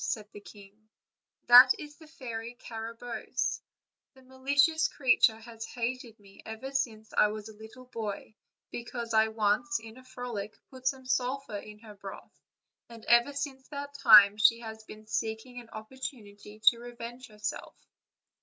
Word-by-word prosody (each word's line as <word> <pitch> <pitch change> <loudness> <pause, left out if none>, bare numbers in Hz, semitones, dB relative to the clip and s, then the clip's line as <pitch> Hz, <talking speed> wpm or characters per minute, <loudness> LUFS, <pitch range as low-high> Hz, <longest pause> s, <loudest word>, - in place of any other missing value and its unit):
said 215 -2 -3
the 205 - -11
king; 205 +1 -16 0.6
"that 250 +1 +10
is 295 -1 -10
the 315 - -15
Fairy 235 -5 -7
Carabosse; 230 +1 -4 0.5
the 265 - -18
malicious 280 +5 +2
creature 255 -4 +3
has 225 0 -10
hated 235 0 -5
me 195 -1 -17
ever 220 +5 -7
since 220 -5 -3
I - - +5
was 215 0 -6
a - - -11
little 220 +4 -13
boy, 220 -4 -6 0.4
because 235 -1 -5
I 220 0 +5
once 220 +2 0
in 225 +1 -12
a 255 - -14
frolic 245 -5 -6
put 260 -1 -6
some 260 -1 -1
sulphur 255 -2 -1
in 210 +1 -11
her 220 -2 -12
broth, 195 -1 -10 0.6
and 230 -2 -12
ever 240 +4 +5
since 270 -2 -5
that 285 -1 -7
time 210 -3 +9
she 230 +2 +4
has 220 -1 -8
been 215 0 -12
seeking 225 +3 -4
an 230 - -17
opportunity 215 -3 -9
to 235 0 +7
revenge 240 +1 -9
herself." 210 -1 -6
230 Hz, 155 wpm, -29 LUFS, 215-255 Hz, 0.6 s, that